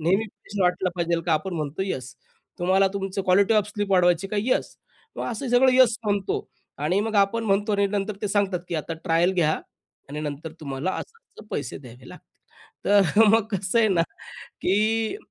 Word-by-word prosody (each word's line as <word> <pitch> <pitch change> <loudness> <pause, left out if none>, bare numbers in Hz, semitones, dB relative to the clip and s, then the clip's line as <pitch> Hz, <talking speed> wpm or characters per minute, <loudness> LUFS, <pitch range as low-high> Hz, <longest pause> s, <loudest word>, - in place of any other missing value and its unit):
नेहमी 190 +7 +2
फ्रेश 205 0 -11
वाटलं 180 0 +1
पाहिजेल 170 -1 0
का? 165 - 0
आपण 165 +4 -1
म्हणतो 155 +2 -3
येस. 130 -9 -4 0.4
तुम्हाला 190 +2 +3
तुमचं 195 0 -3
क्वालिटी 195 +3 +3
ऑफ 210 -1 +2
स्लीप 205 -1 -3
वाढवायची 180 0 +3
का? 210 - -3
येस. 250 +5 -1 0.4
मग - - -3
असं 245 +3 -4
सगळं 255 +2 +5
येस 255 -3 +5
म्हणतो 200 -2 0 0.4
आणि 165 +7 +1
मग 220 +1 -3
आपण 200 +3 +2
म्हणतो 205 +1 +1
आणि 200 0 +2
नंतर 200 +1 -2
ते 210 - 0
सांगतात 195 -3 0
की 170 - -4
आता 160 +1 -3
ट्रायल 170 +1 +2
घ्या 160 -3 +2 0.6
आणि 150 +2 -5
नंतर 150 +1 -5
तुम्हाला 140 +4 -3
असं-असं 460 - -10
पैसे 145 - -4
द्यावे 125 -1 -13
लागतील. - - -16 0.7
तर 220 +2 +5
मग 220 0 +4
कसं 190 +5 0
आहे 220 -1 +4
ना 175 -4 +3 0.6
की 215 - +1
195 Hz, 180 wpm, -24 LUFS, 170-210 Hz, 0.7 s, सगळं